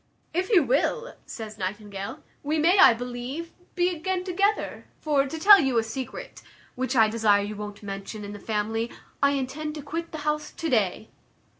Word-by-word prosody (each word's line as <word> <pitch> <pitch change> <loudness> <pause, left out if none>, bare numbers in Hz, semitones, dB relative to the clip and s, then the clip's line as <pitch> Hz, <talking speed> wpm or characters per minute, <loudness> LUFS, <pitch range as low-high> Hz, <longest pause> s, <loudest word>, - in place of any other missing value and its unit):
"If 365 +3 0
you 380 -9 +6
will," 325 - 0
says 215 -2 -8
Nightingale, 200 +1 -5 0.2
"we 300 +2 -1
may, 345 +5 +4
I 240 - +8
believe, 245 +7 -5 0.2
be 355 0 +3
again 365 +3 -2
together; 395 +3 0
for, 285 -3 +1
to 320 - -5
tell 400 +4 +9
you 265 -6 +1
a 225 - +3
secret, 240 +4 -7 0.3
which 260 +1 -2
I 225 -2 +6
desire 215 -2 +3
you 210 +1 -5
won't 205 0 -7
mention 200 +2 -6
in 205 - -7
the 205 - -8
family, 225 +2 -1 0.3
I 280 0 +4
intend 285 +3 -3
to 300 - -7
quit 330 +3 -5
the 315 - -5
house 300 0 -1
to 330 - -3
day." 215 -2 +1
265 Hz, 180 wpm, -26 LUFS, 215-320 Hz, 0.3 s, tell